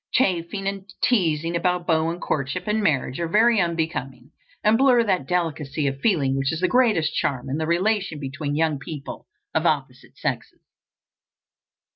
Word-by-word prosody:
Chaffing 195 Hz, -4 st, 0 dB
and 195 Hz, -1 st, -5 dB
teasing 165 Hz, -7 st, +1 dB
about 180 Hz, 0 st, 0 dB
beaux 160 Hz, -1 st, +2 dB
and 170 Hz, +1 st, -4 dB
courtship 140 Hz, +4 st, -2 dB
and 215 Hz, +1 st, 0 dB
marriage 140 Hz, -7 st, 0 dB
are 170 Hz, -, -1 dB
very 220 Hz, +4 st, +4 dB
unbecoming, 160 Hz, -7 st, -3 dB, 0.3 s
and 215 Hz, +1 st, +4 dB
blur 250 Hz, -1 st, +5 dB
that 185 Hz, -10 st, 0 dB
delicacy 160 Hz, -4 st, -1 dB
of 135 Hz, 0 st, -2 dB
feeling 145 Hz, -11 st, +2 dB
which 135 Hz, 0 st, 0 dB
is 160 Hz, +1 st, -4 dB
the 185 Hz, -, +3 dB
greatest 215 Hz, -10 st, +2 dB
charm 130 Hz, -1 st, -2 dB
in 140 Hz, -, -1 dB
the 160 Hz, -, -1 dB
relation 185 Hz, -1 st, 0 dB
between 145 Hz, +1 st, -4 dB
young 155 Hz, -2 st, +1 dB
people 140 Hz, 0 st, -8 dB, 0.3 s
of -, -, +2 dB
opposite -, -, -3 dB
sexes. -, -, -4 dB
165 Hz, 160 wpm, -23 LUFS, 145-195 Hz, 0.3 s, blur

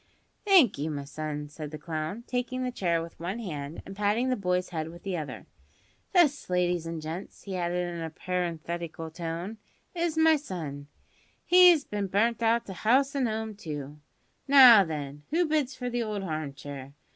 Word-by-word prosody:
"Thank 355 Hz, -, +5 dB
you, 150 Hz, +2 st, -1 dB
my 145 Hz, -2 st, -4 dB
son," 150 Hz, 0 st, -5 dB
said 150 Hz, 0 st, -8 dB
the 155 Hz, -, -7 dB
clown, 160 Hz, +7 st, -4 dB
taking 255 Hz, 0 st, -2 dB
the 250 Hz, -, -2 dB
chair 170 Hz, -7 st, 0 dB
with 165 Hz, -, -11 dB
one 180 Hz, +6 st, -3 dB
hand 155 Hz, -8 st, -6 dB
and 195 Hz, -, -9 dB
patting 210 Hz, +5 st, +1 dB
the 255 Hz, -, +2 dB
boy's 180 Hz, -3 st, -1 dB
head 160 Hz, -2 st, -4 dB
with 170 Hz, +1 st, -12 dB
the 195 Hz, -2 st, -2 dB
other; 155 Hz, -4 st, -6 dB, 0.7 s
"this, 310 Hz, -, +3 dB
ladies 180 Hz, -2 st, +1 dB
and 165 Hz, -1 st, -4 dB
gents," 165 Hz, +5 st, -7 dB
he 195 Hz, -2 st, -5 dB
added 175 Hz, 0 st, -1 dB
in 170 Hz, -, -5 dB
a 165 Hz, -, -3 dB
parenthetical 170 Hz, -1 st, -4 dB
tone, 170 Hz, +6 st, -5 dB, 0.3 s
"is 340 Hz, -2 st, -1 dB
my 320 Hz, 0 st, +5 dB
son; 155 Hz, -, -6 dB, 0.6 s
he's 355 Hz, -4 st, +7 dB
bin 205 Hz, -1 st, -3 dB
burnt 225 Hz, +5 st, +1 dB
hout 230 Hz, +1 st, +2 dB
of 190 Hz, -2 st, -8 dB
'ouse 270 Hz, +5 st, +3 dB
an' 265 Hz, -3 st, +1 dB
'ome, 220 Hz, 0 st, -3 dB
too! 150 Hz, -6 st, -7 dB, 0.5 s
Now, 255 Hz, -7 st, +9 dB
then, 145 Hz, -3 st, -5 dB
who 345 Hz, +3 st, +2 dB
bids 300 Hz, -4 st, 0 dB
for 250 Hz, -, -5 dB
the 240 Hz, 0 st, -1 dB
old 210 Hz, -3 st, -3 dB
harm 155 Hz, -5 st, -4 dB
chair? 140 Hz, -1 st, -8 dB
180 Hz, 180 wpm, -28 LUFS, 160-240 Hz, 0.7 s, Now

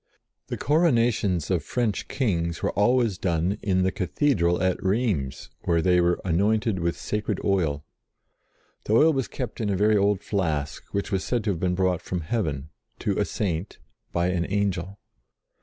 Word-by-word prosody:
The -, -, -4 dB
coro 160 Hz, +5 st, +3 dB
nations 105 Hz, -, +1 dB
of 85 Hz, -5 st, +1 dB
French 115 Hz, +2 st, -1 dB
Kings 85 Hz, -11 st, -1 dB
were -, -, +1 dB
always 115 Hz, -2 st, +2 dB
done 85 Hz, +2 st, 0 dB
in 95 Hz, -3 st, +1 dB
the 95 Hz, -, +2 dB
Cathedral 90 Hz, -, +1 dB
at 95 Hz, +1 st, 0 dB
Rheims, 95 Hz, -, -1 dB
where 85 Hz, -1 st, +2 dB
they 90 Hz, +1 st, +3 dB
were 85 Hz, 0 st, +2 dB
anointed 100 Hz, +3 st, +1 dB
with 85 Hz, 0 st, -1 dB
sacred 105 Hz, 0 st, -2 dB
oil. 80 Hz, -8 st, 0 dB, 1.0 s
The 105 Hz, -, 0 dB
oil 155 Hz, +8 st, +6 dB
was 135 Hz, -3 st, -1 dB
kept 125 Hz, -3 st, -5 dB
in 105 Hz, -, 0 dB
a 100 Hz, -, 0 dB
very 105 Hz, +2 st, +4 dB
old 100 Hz, -1 st, +2 dB
flask, 80 Hz, -8 st, -2 dB
which 100 Hz, +2 st, -2 dB
was 95 Hz, -2 st, 0 dB
said 120 Hz, -3 st, -1 dB
to 105 Hz, -, +1 dB
have 85 Hz, -, -3 dB
been 90 Hz, 0 st, 0 dB
brought 90 Hz, -2 st, +1 dB
from 90 Hz, -2 st, -3 dB
heaven, 75 Hz, -, -2 dB, 0.3 s
to -, -, -1 dB
a -, -, +2 dB
Saint, 95 Hz, -1 st, -3 dB, 0.3 s
by 85 Hz, +1 st, +1 dB
an 90 Hz, -2 st, -1 dB
Angel. 100 Hz, -1 st, -1 dB
95 Hz, 175 wpm, -25 LUFS, 85-110 Hz, 1.0 s, oil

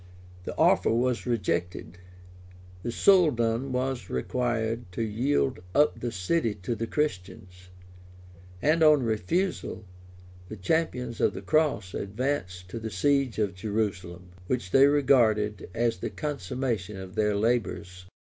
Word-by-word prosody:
The -, -, -6 dB
offer -, -, +4 dB
was 125 Hz, +2 st, 0 dB
rejected; 90 Hz, -5 st, -2 dB, 0.8 s
the 120 Hz, -, -4 dB
soldan 130 Hz, -, +3 dB
was 130 Hz, 0 st, -2 dB
required 120 Hz, -3 st, -2 dB
to 115 Hz, -, -2 dB
yield 125 Hz, +5 st, 0 dB, 0.2 s
up 150 Hz, +1 st, +3 dB
the 120 Hz, -, -3 dB
city 110 Hz, -, 0 dB
to 120 Hz, -, -1 dB
the 115 Hz, 0 st, -3 dB
Christians; 90 Hz, -, -4 dB, 0.9 s
and 155 Hz, +3 st, +3 dB
on 155 Hz, -3 st, +6 dB
his 120 Hz, -, -1 dB
refusal, 165 Hz, -, -1 dB, 0.6 s
the 110 Hz, -, -6 dB
champions 125 Hz, -, -1 dB
of -, -, +2 dB
the 95 Hz, -, -7 dB
cross 125 Hz, -8 st, +1 dB
advanced 100 Hz, -5 st, -3 dB
to 115 Hz, -, -5 dB
the 110 Hz, 0 st, -5 dB
siege 135 Hz, +5 st, +1 dB
of 105 Hz, -4 st, 0 dB
Jerusalem, 95 Hz, -3 st, -3 dB, 0.2 s
which 100 Hz, -7 st, -2 dB
they 135 Hz, +1 st, +7 dB
regarded 115 Hz, -9 st, +2 dB
as 115 Hz, 0 st, 0 dB
the -, -, -3 dB
consummation 125 Hz, -, -3 dB
of 95 Hz, -1 st, -9 dB
their 105 Hz, -1 st, +1 dB
labors. 100 Hz, -5 st, -1 dB
115 Hz, 130 wpm, -27 LUFS, 95-135 Hz, 0.9 s, they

